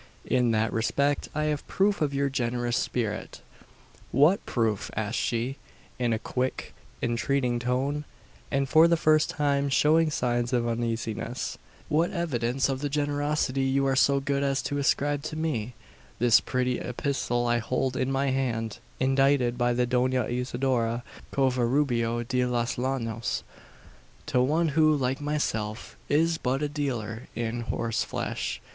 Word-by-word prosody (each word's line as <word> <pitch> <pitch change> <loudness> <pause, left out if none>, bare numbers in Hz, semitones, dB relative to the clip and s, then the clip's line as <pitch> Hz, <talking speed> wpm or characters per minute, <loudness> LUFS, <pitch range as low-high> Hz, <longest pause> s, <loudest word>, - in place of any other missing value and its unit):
In 125 -2 +2
that 110 0 +1
respect, 140 +5 0
I 150 - 0
have 150 -2 -2
proof 200 0 +1
of 150 -2 +1
your 140 0 +1
generous 120 -2 -1
spirit!" 110 -4 -2 0.7
"What 150 +9 +4
proof?" 110 -4 0
asked 110 +2 -1
she, 120 +4 -1 0.4
in 120 -2 +1
a 110 - +2
quick, 125 +3 -3 0.3
entreating 120 +1 0
tone, 135 +5 -1 0.4
and 140 -1 0
for 160 +4 +6
the 170 0 +3
first 155 -1 +3
time 140 -1 +1
showing 155 +4 +4
signs 120 -4 0
of 120 -1 +1
uneasiness. 115 -1 -3 0.3
"What 160 +3 +2
evidence 135 -7 0
of 135 -1 -2
the 145 +1 -2
generosity 145 -1 0
you 135 +1 +2
are 135 -1 +2
so 140 +1 +4
good 140 0 -1
as 140 -1 0
to 145 - -2
ascribe 145 +1 +1
to 155 - -4
me?" 125 -8 -2 0.4
"This 120 -2 +5
pretty 125 -1 -1
epistle 125 -1 -1
I 120 0 +2
hold 130 +2 -1
in 130 +1 0
my 135 0 +1
hand, 115 -4 -2 0.2
indited 135 -2 +3
by 120 0 +1
the 125 +1 +2
Dona 125 +1 +1
Isidora 120 -1 -1 0.3
Covarubio 125 -2 +1
de 125 0 +1
los 120 0 0
Llanos, 120 -3 -2 0.8
to 125 - +2
one 155 +6 +2
who, 155 +1 +4
like 130 +1 -1
myself, 115 -8 -2
is 165 +3 +2
but 135 +3 -1
a - - +1
dealer 125 -6 -3
in 115 0 -2
horseflesh. 115 -1 -2
130 Hz, 145 wpm, -27 LUFS, 120-145 Hz, 0.8 s, for